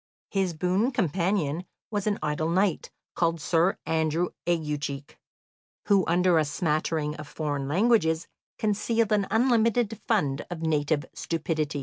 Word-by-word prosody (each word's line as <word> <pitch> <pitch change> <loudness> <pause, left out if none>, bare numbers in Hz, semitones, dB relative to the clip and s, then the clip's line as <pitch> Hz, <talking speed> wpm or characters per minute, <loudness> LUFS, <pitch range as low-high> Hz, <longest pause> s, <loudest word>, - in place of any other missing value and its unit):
His 190 -4 0
boon 185 +8 +1
companion 180 - 0 0.3
was 205 -1 -1
an 205 - +1
idle 155 +1 0
knight, 185 +1 +1 0.2
called 165 -1 +1
Sir 170 +4 +2
Andrew 160 +2 +1 0.2
Aguecheek, 150 -4 -2 0.7
who 200 -2 +5
under 175 0 +4
a - - +3
smattering 150 0 -1
of 150 -1 -8
foreign 145 -3 -3
languages 170 -2 +2 0.3
concealed 220 +1 +1
an 205 -2 +2
unlimited 230 -2 +2
fund 145 -11 +1
of 170 -2 -5
native 150 -1 +1
stupidity. 155 -3 -2
170 Hz, 125 wpm, -27 LUFS, 155-200 Hz, 0.7 s, who